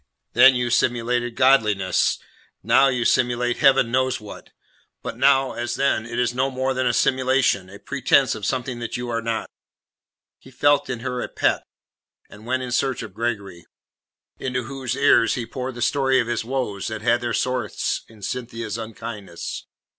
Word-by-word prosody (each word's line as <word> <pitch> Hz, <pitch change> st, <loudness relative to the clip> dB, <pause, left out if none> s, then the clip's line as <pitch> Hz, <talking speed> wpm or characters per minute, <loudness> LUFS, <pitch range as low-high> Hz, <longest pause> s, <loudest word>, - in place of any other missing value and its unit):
Then 130 Hz, -1 st, +7 dB
you 125 Hz, -1 st, -1 dB
simulated 120 Hz, 0 st, 0 dB
godliness; 110 Hz, -8 st, +3 dB, 0.5 s
now 135 Hz, -, +5 dB
you 125 Hz, -3 st, 0 dB
simulate 120 Hz, -1 st, +1 dB
Heaven 135 Hz, -5 st, +4 dB
knows 130 Hz, +1 st, +1 dB
what. 105 Hz, -1 st, -11 dB, 0.5 s
But -, -, -5 dB
now, 135 Hz, -1 st, +3 dB
as 120 Hz, 0 st, -3 dB
then, 125 Hz, -5 st, 0 dB
it 120 Hz, 0 st, -6 dB
is 125 Hz, 0 st, +1 dB
no 130 Hz, +2 st, 0 dB
more 130 Hz, 0 st, -1 dB
than 130 Hz, -1 st, 0 dB
a -, -, +3 dB
simulation, 130 Hz, -7 st, +1 dB
a 100 Hz, -, -11 dB
pretence 140 Hz, +2 st, +2 dB
of 105 Hz, -, -8 dB
something 125 Hz, +1 st, -2 dB
that 120 Hz, 0 st, -4 dB
you 120 Hz, 0 st, -5 dB
are 115 Hz, 0 st, -1 dB
not." 115 Hz, -1 st, -2 dB, 0.9 s
He -, -, -16 dB
left 145 Hz, 0 st, +3 dB
her 125 Hz, 0 st, -4 dB
in -, -, -2 dB
a -, -, -10 dB
pet, -, -, +1 dB, 0.7 s
and 105 Hz, +2 st, -13 dB
went 130 Hz, +1 st, 0 dB
in 125 Hz, -, -5 dB
search 130 Hz, +1 st, 0 dB
of 105 Hz, -, -9 dB
Gregory, 100 Hz, -6 st, -4 dB, 0.7 s
into 130 Hz, -1 st, -2 dB
whose 130 Hz, 0 st, -4 dB
ear 140 Hz, -4 st, +5 dB
he 115 Hz, +1 st, -1 dB
poured 130 Hz, +2 st, -5 dB
the 120 Hz, -, -2 dB
story 135 Hz, 0 st, +2 dB
of 120 Hz, -, +1 dB
his 120 Hz, 0 st, -2 dB
woes 120 Hz, -5 st, -3 dB
that 110 Hz, -1 st, -5 dB
had 120 Hz, +2 st, +2 dB
their 120 Hz, -1 st, -2 dB
source 125 Hz, -4 st, -1 dB
in 110 Hz, -3 st, -17 dB
Cynthia's 115 Hz, -1 st, -4 dB
unkindness. 110 Hz, -5 st, -7 dB
120 Hz, 175 wpm, -23 LUFS, 115-130 Hz, 0.9 s, Then